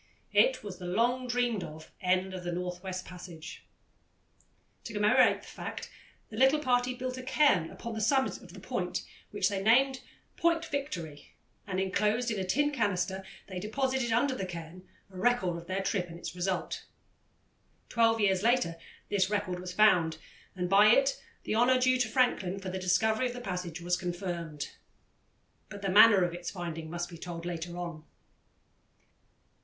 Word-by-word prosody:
It - - +4
was 195 -3 -7
the 180 - -6
long 240 +7 +1
dreamed 245 -5 0
of 155 +1 -10
end 185 +1 +1
of 185 -1 -6
the 175 - -3
North 180 0 -4
West 185 -1 -5
Passage. 175 -3 -10 1.2
To 230 - -6
commemorate 210 0 +4
the - - -14
fact - - -7 0.4
the 215 - -7
little 265 +4 +5
party 250 -3 +1
built 255 0 -4
a - - -5
cairn 255 - +3
upon 235 -1 -7
the 220 - -3
summit 265 +5 +1
of - - -13
the - - -10
point, - - -3 0.3
which - - +1
they 200 -2 -2
named 260 +5 +4 0.4
Point 335 -2 +2
Victory, 180 - -5 0.3
and 190 -1 -2
enclosed 210 +5 +1
in 215 - -2
a - - -1
tin 290 +11 +1
canister 195 -6 -1 0.2
they 185 -2 -6
deposited, 260 +4 -1
under 250 +4 +2
the 195 -6 -4
cairn, 170 +1 -9 0.2
a 185 - -11
record 190 -4 +2
of 170 0 -8
their 190 +1 -2
trip 185 -3 -1
and 170 - -9
its - - -6
result. 180 0 -2 1.0
Twelve 225 -1 +3
years 190 -3 +3
later 230 -7 +2 0.3
this 195 -2 +2
record 200 -4 -1
was 180 0 -6
found, 180 -5 +4 0.4
and 180 -1 -2
by 200 +3 +6
it 270 +5 +4 0.2
the - - -2
honour 245 +3 +4
due 255 0 +3
to 245 - +2
Franklin 215 -6 +1
for 190 -1 -5
the 190 +1 -4
discovery 220 +7 +2
of 245 - -5
the 245 - -6
passage 180 -6 -5
was 175 +1 +1
confirmed. 175 -4 -4 1.0
But 200 0 -9
the 195 - 0
manner 205 0 +7
of 175 -1 -1
its 175 0 -5
finding 165 -3 -6
must 175 +1 -3
be 170 -2 -11
told 170 -1 -6
later 175 0 -4
on. 170 -3 -6
195 Hz, 175 wpm, -30 LUFS, 180-245 Hz, 1.2 s, manner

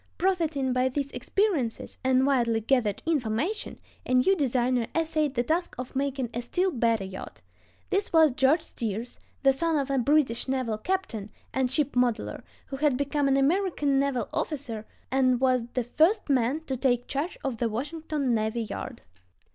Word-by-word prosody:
Profiting 320 -8 +1
by 255 +1 +2
these 280 +1 -3
experiences 345 - -1
and 260 0 +3
widely 240 -5 +2
gathered 225 -3 +1
information, 305 - -1 0.3
a 255 - 0
new 255 +10 +4
designer 250 -5 +1
essayed 310 -3 0
the 240 - +2
task 330 +7 -1
of 250 +1 -7
making 270 -3 -1
a 240 - -2
still 365 +10 0
better 230 - +1
yacht. 190 0 -8 0.5
This 400 +1 0
was 320 -3 +6
George 270 +6 +3
Steers, 230 -4 -5 0.2
the 270 0 +6
son 325 +3 +1
of 275 -1 -1
a 270 - +2
British 270 -2 +2
naval 255 -5 -1
captain 250 - -2 0.2
and 260 -1 +1
ship 285 +2 0
modeler, 245 -2 0 0.2
who 270 - -6
had 285 -2 +2
become 285 +1 0
an 275 0 +3
American 290 -2 +2
naval 270 -5 0
officer 240 -8 -3 0.2
and 255 -2 +3
was 255 -2 +2
the 250 - +1
first 315 - +2
man 260 +4 +2
to 275 -5 -4
take 245 -1 +1
charge 295 +6 -3
of 265 -4 -2
the 230 0 0
Washington 290 +2 -2
navy 220 +1 0
yard. 215 - -6
265 Hz, 165 wpm, -27 LUFS, 240-305 Hz, 0.5 s, was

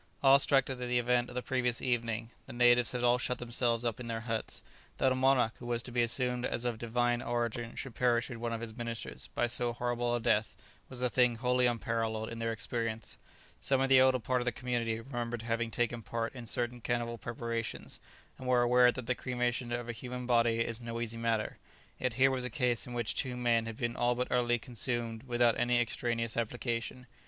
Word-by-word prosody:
Awe 135 0 +8
struck 135 -1 +4
at 130 -2 -4
the 125 0 0
event 120 0 +2
of 125 - -10
the 125 - -2
previous 125 -2 0
evening, 115 -2 -1 0.2
the 130 - -8
natives 120 0 +5
had 125 -1 -2
all 120 0 +4
shut 125 0 -1
themselves 120 0 0
up 115 -1 -1
in 120 - -6
their 115 -1 -3
huts. 115 -1 -4 0.3
That 130 - +3
a - - +2
monarch 130 -3 +3
who 120 - -8
was 120 -1 0
to 125 - -8
be 120 0 +2
assumed 125 +1 0
as 120 - -1
of 120 -2 -1
divine 120 +1 +1
origin 120 -1 -2
should 135 -4 -5
perish 120 -1 +2
with 120 -3 -7
one 120 0 -2
of 115 0 -3
his 110 -2 -6
ministers 115 -1 -5
by 120 - +2
so 120 0 -1
horrible 120 0 -1
a - - 0
death 110 -2 +1 0.3
was 125 -1 -3
a 125 - +3
thing 125 -1 +4
wholly 125 +1 +2
unparalleled 115 -2 -1
in 115 - -6
their 115 0 -1
experience. 115 0 -3 0.4
Some 135 -1 +2
of 135 0 +1
the 135 -1 +7
elder 130 0 +5
part 125 +2 0
of - - -3
the 125 - +1
community 115 -2 -2
remembered 120 -2 -4
having 115 0 -1
taken 120 +1 -1
part 115 +1 -3
in 120 -3 -8
certain 120 +2 -2
cannibal 120 0 -2
preparations, 115 0 -4 0.4
and 130 - -7
were 125 -1 +4
aware 125 0 +6
that 125 -1 -6
the 125 - +1
cremation 125 -1 -2
of 120 0 -2
a - - -2
human 125 +2 -6
body 115 -1 +3
is 115 0 -2
no 115 0 -4
easy 115 -1 -3
matter, 115 -2 -1 0.4
yet 125 -2 0
here 135 +2 +5
was 130 -1 0
a 125 - -1
case 120 0 0
in 125 - -7
which 120 -2 -1
two 125 -2 -2
men 115 -2 +2
had 115 -1 -6
been 120 0 -2
all 120 0 +2
but 125 +1 -2
utterly 120 -1 +2
consumed 120 -1 -2
without 120 -1 +3
any 120 0 +3
extraneous 115 -1 -1
application. 120 +1 -2
120 Hz, 220 wpm, -32 LUFS, 115-125 Hz, 0.4 s, Awe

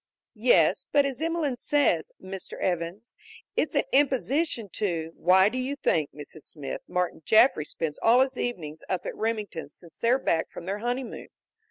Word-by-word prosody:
"Yes, - - +4
but 285 -1 +4
as 270 -1 -3
Emelene 320 -5 0
says, 275 - +2
Mr. 190 0 -7
Evans, 180 +5 -2 0.4
it's - - 0
an - - +4
imposition 275 -2 +2
to 170 -6 -2
" - - -30
"Why 190 +2 +5
do 250 +4 -2
you 265 +3 -2
think, 155 - +1
Mrs. 150 +2 -10
Smith, 145 -4 -6
Martin 180 -2 -1
Jaffry 220 - +5
spends 155 -1 -4
all 240 +3 +6
his 265 0 +1
evenings 160 -12 -4
up 185 -2 -2
at - - -4
Remingtons' 215 -9 -3
since 170 -3 -16
they're 240 +3 +3
back 165 -10 0
from - - -9
their 195 +3 -3
honeymoon? 245 +3 -3
210 Hz, 170 wpm, -27 LUFS, 170-260 Hz, 0.4 s, all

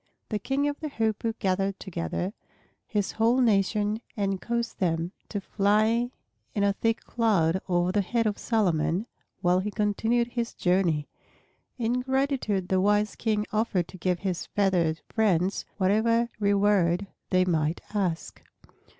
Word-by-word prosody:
The 210 - -1
King 270 +7 0
of 290 0 -3
the 310 - -4
Hoopoes 225 -2 -1
gathered 195 +1 0
together 180 - -3 0.5
his 205 -3 -1
whole 230 +3 +2
nation 210 -1 +2 0.2
and 195 -2 -1
caused 235 -1 -2
them 170 -1 0 0.2
to 205 - -2
fly 215 +5 +2 0.5
in 205 - +1
a 200 0 +3
thick 225 +3 0
cloud 190 -7 +1
over 175 0 +2
the 205 +1 +2
head 230 +4 0
of 210 -1 -1
Solomon 185 -3 +1 0.4
while 180 +1 +3
he 200 +3 -2
continued 225 +3 +1
his 235 -1 -3
journey. 175 -5 +1 0.7
In 240 +1 0
gratitude 265 -8 0
the 185 -1 +3
wise 205 +1 +2
King 215 -2 0
offered 210 -5 +1
to 185 - -10
give 180 0 0
his 185 -3 -2
feathered 180 -6 +1
friends 195 -4 +1
whatever 225 +4 +2
reward 200 -3 +3 0.2
they 185 0 +3
might 160 -2 0
ask. 185 -6 -2
205 Hz, 140 wpm, -27 LUFS, 185-225 Hz, 0.7 s, a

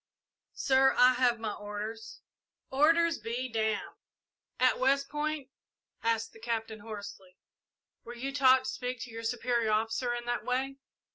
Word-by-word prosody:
"Sir, 265 0 +4
I 250 +1 +7
have 245 -2 +2
my 220 -2 -3
orders." 215 +2 -7 0.5
"Orders 330 +4 +3
be 235 +3 -3
damned!" 220 -2 -2 0.6
"At 255 0 +3
West 275 +2 +2
Point," 295 -2 -3 0.5
asked 225 -1 0
the 225 - -14
Captain, 225 -1 -3
hoarsely, 200 -3 -9 0.7
"were 240 - -9
you 270 +3 -4
taught 260 -2 +5
to 260 - -3
speak 250 -1 -4
to 240 - -7
your 225 0 -6
superior 235 -1 0
officer 225 +3 0
in 240 0 -5
that 240 -2 -2
way?" 260 +3 -1
240 Hz, 145 wpm, -30 LUFS, 225-265 Hz, 0.7 s, I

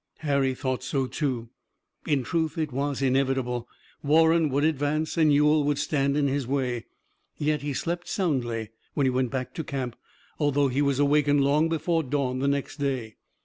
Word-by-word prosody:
Harry 140 -3 +1
thought 130 -1 -2
so 135 0 -1
too. 125 -5 -3 0.6
In 140 -4 +1
truth, 160 +2 -1
it 155 -2 -1
was 140 +1 -2
inevitable. 130 -2 0 0.3
Warren 160 +2 +4
would 140 +2 0
advance 155 0 0
and 155 -2 +4
Ewell 150 +1 +4
would 145 -1 +1
stand 140 -1 0
in 145 -1 +2
his 135 -2 -1
way. 125 -4 -1 0.5
Yet 150 -1 0
he 145 0 -3
slept 175 +4 -3
soundly 120 - -1 0.2
when 140 - +2
he 130 - +3
went 125 -1 0
back 130 0 -4
to 160 - -4
camp, 130 -5 -4 0.4
although 145 -2 +2
he 130 +3 0
was 140 -2 +1
awakened 145 0 +3
long 150 +4 +3
before 165 +1 0
dawn 130 -3 -1
the 140 - 0
next 140 0 -1
day. 130 -6 -3
140 Hz, 175 wpm, -26 LUFS, 130-150 Hz, 0.6 s, Warren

